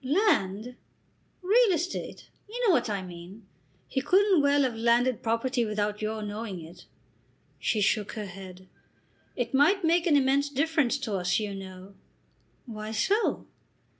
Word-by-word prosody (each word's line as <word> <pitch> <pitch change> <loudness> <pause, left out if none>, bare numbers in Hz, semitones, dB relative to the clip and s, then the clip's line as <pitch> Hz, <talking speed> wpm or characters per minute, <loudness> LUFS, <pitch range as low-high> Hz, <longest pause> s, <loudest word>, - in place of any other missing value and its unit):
"Land!" 250 - +1 0.7
"Real 435 +4 +4
estate. 350 +1 -4 0.2
You 485 +2 -1
know 380 - +5
what 240 - +1
I 200 -2 -2
mean. 180 +4 -11 0.4
He 265 - -2
couldn't 380 +2 +4
well 285 0 +3
have 250 -3 -1
landed 235 +2 +2
property 235 +2 0
without 210 -1 -2
your 215 0 -3
knowing 210 -2 -5
it." 170 +2 -13 0.7
She 215 - 0
shook 205 +1 +1
her 215 -2 -5
head. 185 -1 -11 0.7
"It 245 - -3
might 335 +9 +4
make 335 +1 +2
an 300 -4 +5
immense 280 +1 +2
difference 285 -2 +1
to 220 -7 -3
us, 180 -1 0
you 210 -2 -4
know." 190 0 -10 0.7
"Why 215 -2 -7
so?" 405 - 0
235 Hz, 145 wpm, -27 LUFS, 205-290 Hz, 0.7 s, know